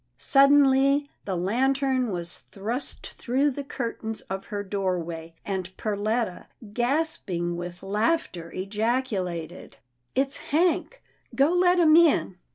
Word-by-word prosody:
Suddenly 275 Hz, 0 st, +4 dB, 0.2 s
the 190 Hz, -, -2 dB
lantern 260 Hz, +6 st, +1 dB
was 175 Hz, -2 st, -3 dB
thrust 225 Hz, +7 st, -5 dB
through 270 Hz, +4 st, 0 dB
the 280 Hz, +2 st, -5 dB
curtains 230 Hz, -4 st, -4 dB
of 195 Hz, +1 st, -6 dB
her 205 Hz, -2 st, -4 dB
doorway, 175 Hz, -4 st, -3 dB
and 190 Hz, -2 st, -3 dB
Perletta, 215 Hz, -1 st, -2 dB, 0.3 s
gasping 240 Hz, -, -1 dB
with 175 Hz, +1 st, -7 dB
laughter, 205 Hz, -, -1 dB
ejaculated, 195 Hz, -5 st, -3 dB, 0.2 s
" 125 Hz, 0 st, -48 dB
It's 270 Hz, +1 st, 0 dB
Hank 350 Hz, +10 st, 0 dB
— -, -, -19 dB
go 280 Hz, +4 st, +4 dB
let 360 Hz, 0 st, +4 dB
him 320 Hz, -3 st, +6 dB
in." 320 Hz, -, +4 dB
225 Hz, 120 wpm, -26 LUFS, 185-275 Hz, 0.3 s, him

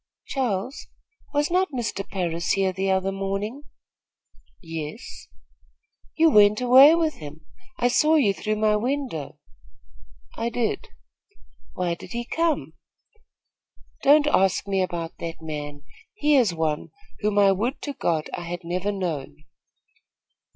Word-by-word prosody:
"Charles, 250 Hz, -1 st, -3 dB, 0.4 s
was 295 Hz, +2 st, 0 dB
not 370 Hz, -1 st, +2 dB
Mr. 235 Hz, -6 st, -3 dB
Parris 170 Hz, -3 st, -1 dB
here 190 Hz, -1 st, +1 dB
the 195 Hz, +1 st, -1 dB
other 190 Hz, 0 st, +1 dB
morning?" 195 Hz, +8 st, -4 dB, 0.9 s
"Yes." 165 Hz, +4 st, -8 dB, 0.9 s
"You 325 Hz, 0 st, +5 dB
went 210 Hz, -1 st, +6 dB
away 260 Hz, +5 st, +8 dB
with 325 Hz, -2 st, 0 dB
him; 150 Hz, 0 st, -11 dB, 0.3 s
I 245 Hz, -, +2 dB
saw 305 Hz, +5 st, +3 dB
you 235 Hz, -10 st, +3 dB
through 215 Hz, +2 st, -2 dB
my 215 Hz, 0 st, +2 dB
window." 245 Hz, -, -3 dB, 1.0 s
"I 230 Hz, +1 st, -2 dB
did." 240 Hz, -, -2 dB, 0.9 s
"Why 180 Hz, -2 st, -1 dB
did 170 Hz, -, -9 dB
he 240 Hz, 0 st, -3 dB
come?" 330 Hz, +3 st, -1 dB, 1.3 s
"Don't 290 Hz, +2 st, +5 dB
ask 195 Hz, -9 st, +2 dB
me 195 Hz, -1 st, +1 dB
about 170 Hz, -3 st, -4 dB
that 165 Hz, -1 st, -6 dB
man. 145 Hz, -2 st, -6 dB, 0.3 s
He 300 Hz, -7 st, +2 dB
is 240 Hz, -8 st, +4 dB
one 160 Hz, -2 st, -2 dB, 0.3 s
whom 210 Hz, -1 st, -1 dB
I 200 Hz, -1 st, +6 dB
would 230 Hz, +8 st, -1 dB
to 290 Hz, -, -4 dB
God 160 Hz, -, -1 dB
I 175 Hz, -, -5 dB
had 175 Hz, +1 st, -6 dB
never 180 Hz, +4 st, -2 dB
known." 155 Hz, -, -5 dB
200 Hz, 130 wpm, -24 LUFS, 170-260 Hz, 1.3 s, away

